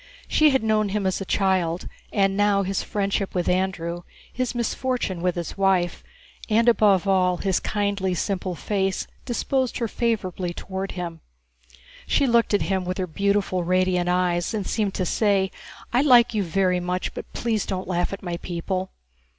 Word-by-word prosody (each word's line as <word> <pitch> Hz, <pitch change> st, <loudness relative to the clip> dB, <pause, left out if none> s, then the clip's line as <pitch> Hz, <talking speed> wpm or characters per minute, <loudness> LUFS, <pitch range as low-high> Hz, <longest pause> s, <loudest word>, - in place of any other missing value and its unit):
She 310 Hz, 0 st, +5 dB
had 265 Hz, -4 st, +1 dB
known 215 Hz, -1 st, +2 dB
him 200 Hz, 0 st, -1 dB
as 190 Hz, +1 st, 0 dB
a -, -, -3 dB
child, 185 Hz, -4 st, 0 dB, 0.2 s
and 195 Hz, -1 st, +2 dB
now 205 Hz, -1 st, +3 dB
his 195 Hz, 0 st, -1 dB
friendship 195 Hz, -1 st, -2 dB
with 175 Hz, -1 st, 0 dB
Andrew, 175 Hz, -2 st, -1 dB, 0.3 s
his 255 Hz, -1 st, -2 dB
misfortune 240 Hz, -5 st, -1 dB
with 180 Hz, 0 st, 0 dB
his 175 Hz, +2 st, -5 dB
wife, 190 Hz, -3 st, +2 dB, 0.5 s
and 225 Hz, +2 st, +3 dB
above 205 Hz, -5 st, +4 dB
all 185 Hz, -2 st, +3 dB
his 190 Hz, -1 st, 0 dB
kindly, 200 Hz, -3 st, -1 dB
simple 185 Hz, 0 st, -2 dB
face 195 Hz, 0 st, -1 dB, 0.2 s
disposed 260 Hz, +1 st, -1 dB
her 235 Hz, -, -1 dB
favorably 185 Hz, -7 st, -2 dB
toward 190 Hz, 0 st, -5 dB
him. 170 Hz, -3 st, -5 dB, 0.9 s
She 280 Hz, -, +3 dB
looked 235 Hz, -4 st, +3 dB
at -, -, +1 dB
him 190 Hz, -1 st, 0 dB
with 180 Hz, +1 st, -3 dB
her 185 Hz, -, -1 dB
beautiful 195 Hz, +1 st, 0 dB
radiant 180 Hz, 0 st, +1 dB
eyes 180 Hz, +1 st, +1 dB
and 205 Hz, -3 st, -2 dB
seemed 210 Hz, -3 st, -1 dB
to 185 Hz, -, -1 dB
say, 195 Hz, 0 st, +2 dB, 0.4 s
"I 245 Hz, -, +4 dB
like 245 Hz, -5 st, +6 dB
you 215 Hz, -, +1 dB
very 185 Hz, 0 st, +1 dB
much, 180 Hz, +1 st, -2 dB
but -, -, -8 dB
please 225 Hz, -3 st, -1 dB
don't 190 Hz, -1 st, -3 dB
laugh 175 Hz, -1 st, 0 dB
at 195 Hz, -, -6 dB
my 175 Hz, -2 st, -3 dB
people." 185 Hz, +2 st, -3 dB
190 Hz, 170 wpm, -24 LUFS, 180-210 Hz, 0.9 s, like